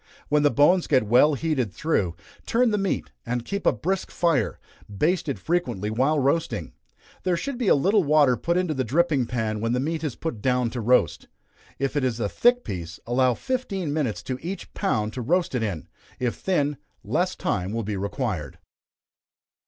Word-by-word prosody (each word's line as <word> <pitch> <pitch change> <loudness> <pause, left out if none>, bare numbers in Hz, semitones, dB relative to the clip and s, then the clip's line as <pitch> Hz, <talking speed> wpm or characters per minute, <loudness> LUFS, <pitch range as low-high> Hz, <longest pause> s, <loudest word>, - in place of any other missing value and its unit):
When 150 0 +3
the 145 - +5
bones 165 +6 +4
get 130 - +3
well 125 +8 +5
heated 135 - -1
through, 90 - 0 0.3
turn 240 0 +3
the 210 - +1
meat, 195 - -2
and 120 - -3
keep 200 0 -2
a - - +7
brisk 190 +2 -2
fire 165 -10 +1 0.3
baste 155 - 0
it 135 - -2
frequently 115 - -1
while 135 +7 +2
roasting. 135 - 0 0.5
There 180 -2 +1
should 270 +6 -4
be 240 - 0
a - - +6
little 195 +8 +3
water 145 -4 +4
put 170 +9 0
into 180 -3 +1
the 130 -2 -1
dripping 145 -1 +1
pan 110 -3 -2
when 115 +1 0
the 125 - +1
meat 160 +4 -2
is 145 -6 -2
put 140 -10 -5
down 125 -1 +1
to 120 - -4
roast. 115 -7 +2 0.5
If 135 +1 -2
it 145 - +1
is 120 -3 0
a 105 - 0
thick 245 - +3
piece, 85 -4 -6
allow 125 +1 +2
fifteen 200 - -2
minutes 145 -9 -1
to 130 -1 -4
each 185 +4 -6
pound 110 - -1
to 130 - -4
roast 170 +8 +1
it 125 - 0
in 95 -9 -3 0.3
if 125 -2 -1
thin, 145 -6 0 0.3
less 175 - 0
time 95 0 -2
will 115 +1 -2
be 105 0 -3
required. 100 - -3
135 Hz, 190 wpm, -25 LUFS, 115-170 Hz, 0.5 s, a